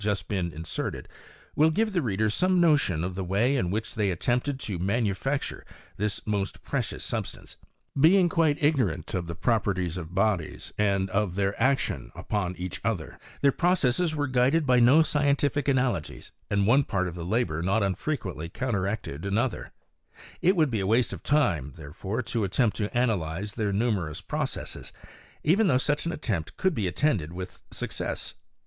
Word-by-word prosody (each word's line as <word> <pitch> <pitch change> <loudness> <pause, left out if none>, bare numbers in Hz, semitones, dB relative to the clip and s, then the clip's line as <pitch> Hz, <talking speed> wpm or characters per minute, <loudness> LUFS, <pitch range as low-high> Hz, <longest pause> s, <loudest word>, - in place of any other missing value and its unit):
been - - -5
just 100 +1 -2 0.2
inserted, 80 0 -4 0.5
will 155 +2 +5
givi 215 +7 +1
the 180 -3 +1
reader 110 -4 0
some 185 - +2
notion 145 - +3
of 90 +1 -2
the 95 +1 -3
way 105 +9 +2
in 90 -10 0
which 110 +4 -2
they 105 -2 +1
at 90 -2 -3
tempted 125 +3 0
to 100 -9 -4
manufacture 110 +7 -1 0.3
this 105 0 -2
most 100 -2 -2
precious - - -2
substance - - -4 0.4
Being 175 +6 +5
quite 160 -3 +1
ignorant 135 - +1
of 90 -2 -2
the 85 - -5
properties 95 -6 0
of 85 0 -7
bodies, 100 -5 0
an 100 -2 +1
of 100 -2 0
their 100 0 +1
action 135 0 +1 0.2
on 90 -4 0
each 90 0 -5
other, 100 -9 -3 0.2
their 140 - +5
processes 170 -1 +2
wei 145 -1 0
guided 130 +6 +3
by 125 -2 +4
no 130 +7 +6
scientific 145 -1 +1
analogies, 125 - 0 0.2
and 100 -1 +2
one 130 +7 +5
part 95 -7 -1
of 85 - -6
tl 85 0 -5
labour 110 -8 0
not 100 +5 +1
unfrequently 95 - -2
counteracted 100 - -2
another; 110 +5 -1 0.7
itwoul 175 -3 +4
be 115 -5 -1
a 95 - -1
waste 115 +3 +2
of - - -7
time, 85 - +1
therefore, 85 - -4
to 115 0 -2
attempt 105 +3 +1
to 105 +2 -2
analyze 100 -5 0
the 105 -3 -1
numerous 100 -7 0
processes, - - -4 0.5
even 195 +8 +4
though 130 -7 +4
such 145 +4 0
an - - 0
attem' 100 - -2
could 190 -2 +2
be 105 -9 -1
attended 90 - 0
with 90 +1 -7
success. - - -3
110 Hz, 165 wpm, -27 LUFS, 95-140 Hz, 0.7 s, no